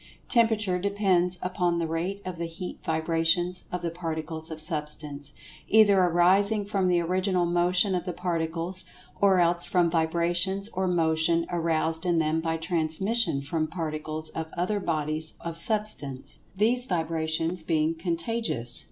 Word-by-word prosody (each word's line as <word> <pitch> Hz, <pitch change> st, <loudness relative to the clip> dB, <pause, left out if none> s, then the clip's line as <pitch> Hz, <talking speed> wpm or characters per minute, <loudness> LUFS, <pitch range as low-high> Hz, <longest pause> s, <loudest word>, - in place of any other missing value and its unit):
Temperature 220 Hz, -6 st, +2 dB
depends 185 Hz, -2 st, +1 dB
upon 180 Hz, -1 st, 0 dB
the 170 Hz, -, 0 dB
rate 170 Hz, +5 st, -3 dB
of 180 Hz, -2 st, -6 dB
the 170 Hz, -, -2 dB
heat 180 Hz, +2 st, -7 dB
vibrations 165 Hz, +2 st, 0 dB
of 180 Hz, -1 st, -4 dB
the 170 Hz, -, -1 dB
Particles 160 Hz, -1 st, -5 dB
of 160 Hz, -1 st, -7 dB
Substance, 150 Hz, -2 st, -3 dB, 0.4 s
either 205 Hz, -3 st, +5 dB
arising 190 Hz, +4 st, +3 dB
from 195 Hz, -2 st, 0 dB
the 175 Hz, -1 st, +3 dB
Original 180 Hz, +1 st, +1 dB
Motion 180 Hz, +3 st, +2 dB
of 180 Hz, -1 st, -1 dB
the 180 Hz, -, -2 dB
Particles, 170 Hz, +1 st, -3 dB, 0.4 s
or 195 Hz, -2 st, +5 dB
else 170 Hz, 0 st, +3 dB
from 175 Hz, -2 st, +1 dB
vibrations 170 Hz, +4 st, 0 dB
or 190 Hz, -3 st, -2 dB
Motion 165 Hz, -1 st, +2 dB
aroused 165 Hz, -1 st, 0 dB
in 175 Hz, -2 st, +1 dB
them 160 Hz, 0 st, +1 dB
by[Pg 160 Hz, 0 st, -2 dB
122] -, -, -9 dB
transmission 175 Hz, +1 st, +1 dB
from 155 Hz, +3 st, -2 dB
Particles 155 Hz, -1 st, -3 dB
of 160 Hz, 0 st, -5 dB
other 190 Hz, +4 st, 0 dB
bodies 155 Hz, -2 st, -1 dB
of 170 Hz, -1 st, -5 dB
Substance—these 210 Hz, -, 0 dB
vibrations 165 Hz, -1 st, -1 dB
being 160 Hz, 0 st, +1 dB
"contagious." 165 Hz, -, 0 dB
170 Hz, 145 wpm, -27 LUFS, 160-185 Hz, 0.4 s, either